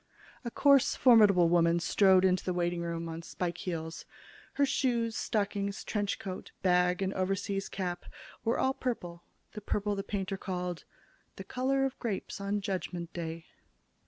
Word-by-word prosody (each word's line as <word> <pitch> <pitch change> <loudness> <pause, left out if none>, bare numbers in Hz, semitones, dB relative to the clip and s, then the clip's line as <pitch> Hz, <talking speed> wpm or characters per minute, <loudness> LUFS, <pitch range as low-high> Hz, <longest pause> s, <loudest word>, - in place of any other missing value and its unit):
A 240 - -3
coarse, 280 +2 +4
formidable 210 -8 +6
woman 170 0 +3
strode 190 +1 +4
into 185 -1 +2
the 180 - -2
waiting 175 0 0
room 170 0 -3
on 165 0 -5
spike 175 +1 -4
heels. 160 -2 -4 0.5
Her 285 - +3
shoes, 235 -4 0
stockings, 200 -1 -2
trench 205 -2 -1
coat, 185 -3 -7
bag 180 0 +3
and 190 +1 -1
overseas 195 +1 -2
cap 180 -2 -4 0.4
were 230 - +1
all 265 - +2
purple, 175 -11 -4 0.3
the 210 - -8
purple 205 0 -1
the 200 - -2
painter 195 -1 -3
called 180 -2 -4 0.5
"the - - -7
color 270 +2 0
of 270 - -4
grapes 210 -3 -4
on 200 +1 -1
Judgment 180 -3 -4
Day." 165 -1 -5
190 Hz, 155 wpm, -31 LUFS, 175-210 Hz, 0.5 s, formidable